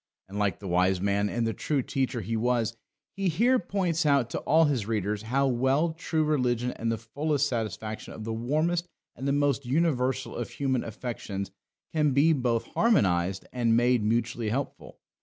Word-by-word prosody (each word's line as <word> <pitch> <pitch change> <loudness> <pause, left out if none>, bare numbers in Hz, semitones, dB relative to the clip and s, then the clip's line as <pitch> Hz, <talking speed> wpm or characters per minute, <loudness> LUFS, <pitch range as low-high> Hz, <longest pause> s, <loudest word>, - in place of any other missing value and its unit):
And, 100 +2 -6
like 100 -2 +1
the 100 - -8
wise 90 +1 +2
man 100 +1 +1
and 120 +1 -1
the 115 - 0
true 140 +2 -1
teacher 130 -3 -1
he 115 +3 -3
was, 115 0 +1 0.4
he 195 -1 0
here 240 +10 +3
points 175 -3 0
out 140 -5 +2
to - - -2
all 160 +2 +4
his 130 -8 0
readers 105 -2 -1
how 130 +5 +1
well 135 +6 +2
true 160 -1 -1
religion 125 -5 +1
and 115 -1 -2
the 115 - -1
fullest 145 +6 -1
satisfaction 110 -3 -4
of 110 - -7
the 115 +1 -3
warmest 155 +9 0 0.3
and 135 +3 -4
the - - +2
most 145 -1 +1
universal 130 -2 0
of - - -4
human 130 -3 -1
affections 105 -4 -5 0.4
can 150 -3 +2
be 150 +5 +5
both 120 -5 0
harmonised 95 - +2
and 115 -2 +2
made 120 -1 +3
mutually 115 +1 0
helpful. 135 +5 -4
125 Hz, 175 wpm, -28 LUFS, 110-145 Hz, 0.4 s, be